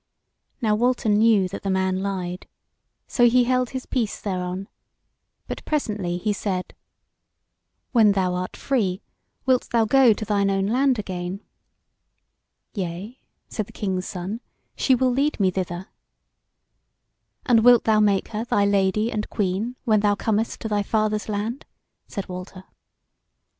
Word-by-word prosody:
Now 215 -1 +3
Walter 240 +1 +1
knew 210 -2 +4
that 190 - -6
the 195 - -3
man 190 0 +1
lied, 185 -2 -4 0.6
so 240 -1 +4
he 250 +1 +4
held 255 0 +1
his 260 -1 -5
peace 230 -5 -2
thereon; 185 -1 -3 0.8
but - - -6
presently 210 - -1
he 210 +3 -1
said: 190 -3 -3 1.2
"When 220 -5 +5
thou 185 -2 +1
art 180 0 -4
free 210 -8 -1 0.4
wilt 255 -1 +2
thou 230 -2 +3
go 260 +1 +5
to 215 - -6
thine 200 -1 +1
own 195 0 +1
land 255 +4 +2
again?" 185 -1 -4 1.3
"Yea," 195 +5 -5 0.3
said 215 -3 -4
the - - -16
King's 185 -3 -2
Son; 190 +6 -5 0.3
"she 260 - +3
will 255 0 +2
lead 280 +3 0
me 190 -2 +3
thither." 180 0 -4 1.6
"And 230 -3 +4
wilt 245 0 +7
thou 220 -1 +3
make 205 -2 +2
her 220 0 -3
thy 205 -4 +2
lady 200 +3 +2
and 210 -1 -3
queen 205 +5 -1
when 215 -4 +3
thou 205 0 +2
comest 220 +2 -1
to - - -3
thy 210 -1 +1
father's 215 +1 0
land?" 215 +5 -3 0.4
said 200 -3 -5
Walter. 185 +1 -8
210 Hz, 145 wpm, -24 LUFS, 190-230 Hz, 1.6 s, wilt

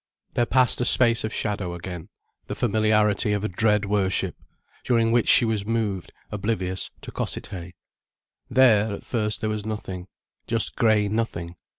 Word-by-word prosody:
There 120 - +1
passed 125 0 +3
a - - +1
space 115 -2 +4
of 110 - -3
shadow 100 -5 -2
again, 85 -1 -8 0.4
the - - -4
familiarity 105 -2 +2
of 105 0 -2
dread 105 +2 +1
worship, 100 -2 0 0.5
during 115 -2 +2
which 120 -1 +2
she - - +7
was 110 -3 -1
moved, 105 -4 -2 0.2
oblivious, 95 -3 -2
to - - -9
Cossethay. 90 -3 -5 0.7
There, 110 -5 +4
at - - -8
first, 110 -3 -2
there 110 - -1
was 105 -1 -3
nothing—just 105 +2 -2
grey 110 -3 +3
nothing. 100 -6 -3
105 Hz, 145 wpm, -24 LUFS, 95-115 Hz, 0.7 s, she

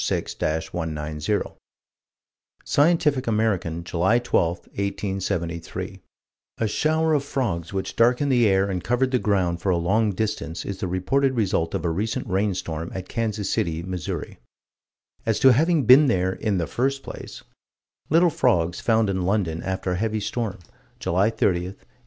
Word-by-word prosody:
Scientific 145 -4 +2
American, 100 -7 0
July 90 +7 +2
12, 120 -8 +2
1873: 95 -4 -4 0.6
"A 110 - 0
shower 160 +7 +1
of 145 -2 +2
frogs 110 - -2
which 95 -1 -3
darkened 125 +4 +3
the 120 -3 +4
air 95 0 +3
and 95 -2 -3
covered 125 +4 +1
the 125 - +2
ground 90 -6 0
for 95 - -1
a 90 - +3
long 105 +6 +2
distance 95 -5 -3
is 100 -1 -5
the 95 - -2
reported 130 +10 +1
result 95 -7 0
of 80 - -3
a 85 - +1
recent 105 +6 -2
rainstorm 90 -5 -2
at 95 -1 -5
Kansas 110 -3 -2
City, 80 0 -1
Mo." 90 0 -4 1.3
As 110 - +1
to 130 -1 +7
having 160 +3 +3
been 135 +5 +8
there 95 -5 +1
"in 105 -1 -1
the 85 - 0
first 135 - -1
place": - - -9 0.7
Little 170 +2 +4
frogs 90 - +1
found 110 -2 +2
in 95 -1 -1
London, 90 -4 0
after 95 0 -2
a - - 0
heavy 110 +2 -1
storm, 110 -1 -3 0.4
July 95 +5 +2
30, 115 - -1
1838. 90 +1 0
100 Hz, 145 wpm, -24 LUFS, 90-120 Hz, 1.3 s, been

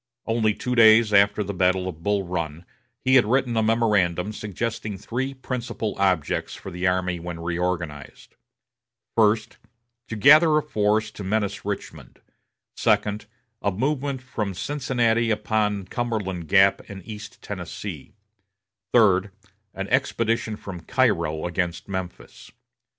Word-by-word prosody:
Only 110 -2 +1
two 125 - -3
days 110 -2 +6
after 100 +1 +4
the 100 +1 -5
battle 90 0 +1
of 80 -3 -7
Bull 100 +2 0
Run, 85 -2 -4 0.4
he 130 - +3
had 130 -4 +6
written 125 0 +1
a 110 - +3
memorandum 105 -4 +1
suggesting 105 0 -4
three 130 +7 -4
principal 120 -4 -4
objects 95 -5 0
for 95 - -9
the 90 +1 -1
army 90 -1 0
when 85 0 -6
reorganized: 85 -4 -4 0.8
First, 110 -1 +2 0.5
to 115 - -5
gather 150 +7 +6
a 155 - +1
force 105 -5 0
to 105 - -8
menace 100 0 -2
Richmond; 100 -1 -6 0.6
second, 105 +1 +1 0.3
a 100 - +1
movement 135 +5 -2
from 105 -7 -4
Cincinnati 120 -3 0
upon 105 -2 0
Cumberland 100 -6 -3
Gap 100 +1 +4
and 95 -3 -9
East 110 +1 -9
Tennessee; 90 -3 -7 0.8
third, 105 -4 +4 0.5
an 95 0 -4
expedition 115 -4 0
from 95 -4 -8
Cairo 85 -10 +1
against 90 -1 -2
Memphis. 95 -2 -7
105 Hz, 130 wpm, -24 LUFS, 90-115 Hz, 0.8 s, days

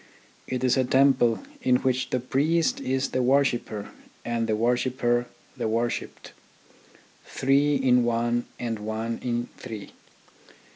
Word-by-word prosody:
It 130 0 -3
is 130 +1 +3
a 130 - +3
temple 130 -3 +3 0.2
in 125 -1 +3
which 130 0 0
the 125 - 0
priest 155 +7 +1
is 130 +1 -1
the 130 - 0
worshipper 125 -5 +1 0.4
and 115 -1 -1
the 110 - +1
wor 120 +3 +2
shipper 120 -1 0 0.3
the - - -2
worshipped: 115 +2 -3 0.9
three 140 +2 +2
in 125 -2 +3
one 120 0 0
and 115 -2 -3
one 110 +2 -3
in 120 -1 -2
three. 110 -3 -8
125 Hz, 135 wpm, -26 LUFS, 115-130 Hz, 0.9 s, is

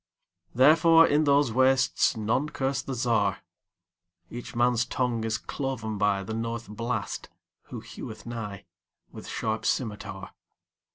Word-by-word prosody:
Therefore, 165 +5 +6
in 150 0 +2
those 140 -3 +3
wastesNone 130 0 +2
curse 135 0 -1
the 135 - -5
Czar.Each 90 -3 -4
man's 120 0 +3
tongue 120 -2 -1
is 110 -1 -1
cloven 115 -7 -4
byThe 100 +1 0
North 115 +1 -4
Blast, 110 0 -4 0.4
who - - -8
heweth - - -9
nighWith 110 -5 -10
sharp 110 0 -2
scymitar. 100 -5 -3
115 Hz, 105 wpm, -27 LUFS, 105-130 Hz, 0.4 s, Therefore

